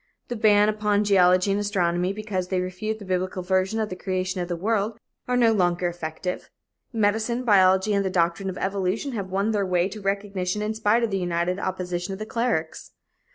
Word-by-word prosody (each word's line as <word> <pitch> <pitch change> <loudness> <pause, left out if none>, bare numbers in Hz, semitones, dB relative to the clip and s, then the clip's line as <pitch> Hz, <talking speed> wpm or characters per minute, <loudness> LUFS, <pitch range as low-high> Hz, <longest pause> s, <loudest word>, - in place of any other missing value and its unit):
The 245 - -2
ban 210 -2 +4
upon 210 -1 +1
geology 185 -1 +4
and 200 - +1
astronomy, 180 -3 0
because 200 -3 -3
they 185 0 0
refute 185 +4 -3
the 205 - -10
biblical 185 0 -2
version 190 +4 +1
of 215 -1 -1
the 185 - -5
creation 185 0 -2
of 175 - -3
the 175 - -2
world, 210 +4 -1 0.3
are 250 0 +1
no 235 -2 +5
longer 180 -4 +1
effective. 175 +1 -5 0.4
Medicine, 225 +2 0
biology 190 -2 +4
and 200 0 +2
the 190 - -1
doctrine 180 +2 0
of 185 - -6
evolution 195 +7 -1
have 200 -6 -4
won 195 +3 0
their 205 -2 +1
way 180 -1 +1
to 210 +2 -8
recognition 195 0 -2
in 215 +1 -1
spite 220 +2 +2
of 230 - 0
the 195 - 0
united 175 +1 -1
opposition 180 -1 -3
of - - -5
the 215 - -5
clerics. 225 -9 -2
195 Hz, 200 wpm, -25 LUFS, 180-215 Hz, 0.4 s, no